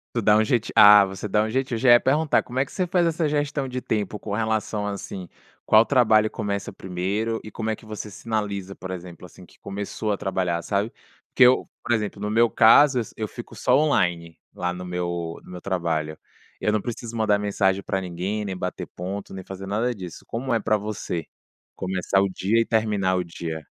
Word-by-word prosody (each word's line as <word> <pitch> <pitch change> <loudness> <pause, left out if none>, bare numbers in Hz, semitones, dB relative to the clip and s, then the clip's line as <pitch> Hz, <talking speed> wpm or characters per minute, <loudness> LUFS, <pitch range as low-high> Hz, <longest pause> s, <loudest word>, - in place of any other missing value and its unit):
Tu 115 - +2
dá 105 0 +4
um 110 - +5
jeitinho 110 +1 0
ah, 105 -1 +9
você 95 +2 -6
dá 105 +2 +2
um - - -2
jeitinho. 130 -1 -1
Já 125 +2 +4
ia 120 0 +8
perguntar, 150 +3 +2
como 125 +1 -6
é 135 - +3
que - - -16
você 185 - 0
faz 175 -1 +2
essa 165 -1 0
gestão 145 -2 -1
de 125 0 -4
tempo, 105 -3 -2
com 100 -1 -5
relação, 110 -1 -1
assim, 100 -2 -6 0.4
qual 110 +1 +6
trabalho 110 -5 +4
começa 100 -2 -4
primeiro? 100 +5 -2
E 110 - -8
como 110 +1 -3
é 110 - -1
que 110 - -17
você 105 0 -6
sinaliza, 100 -2 -3
por 95 - -8
exemplo, 90 -1 -8
assim, 90 0 -14
que - - -22
começou 100 +2 -4
a 100 - +1
trabalhar, 90 -3 -1
sabe? 100 +2 -1 0.4
Porque 130 - +5
eu 125 +1 +5 0.2
por 120 - -1
exemplo, 105 -2 -1
no 105 - -2
meu 115 +2 +3
caso 135 +4 +6
eu - - +2
s 110 - -12
eu 110 -1 -3
fico 120 +2 -10
só 125 - +2
online, 90 - +1 0.2
lá 90 0 -2
no 90 0 -7
meu 85 -2 -3
no - - -14
meu 90 - -7
trabalho. 80 -5 -2 0.4
Eu 105 - +1
não 110 - 0
preciso 120 -1 -6
mandar 110 -2 +2
mensagem 100 -1 +1
pra 95 - -2
ninguém, 95 +4 -3
nem 95 -2 -4
bater 90 0 -4
ponto, 95 +3 -6
nem 95 -1 -7
fazer 95 0 -8
nada 115 +5 0
disso. 90 -4 -9
Como 125 +3 -3
é 115 - +3
pra 110 0 +1
você, 100 -5 -4 0.5
começar 95 +1 0
o 100 - +2
dia 100 +4 +1
e 115 - +1
terminar 105 -4 +1
o 90 -1 0
dia? 80 -2 -6
105 Hz, 215 wpm, -24 LUFS, 95-115 Hz, 0.5 s, ah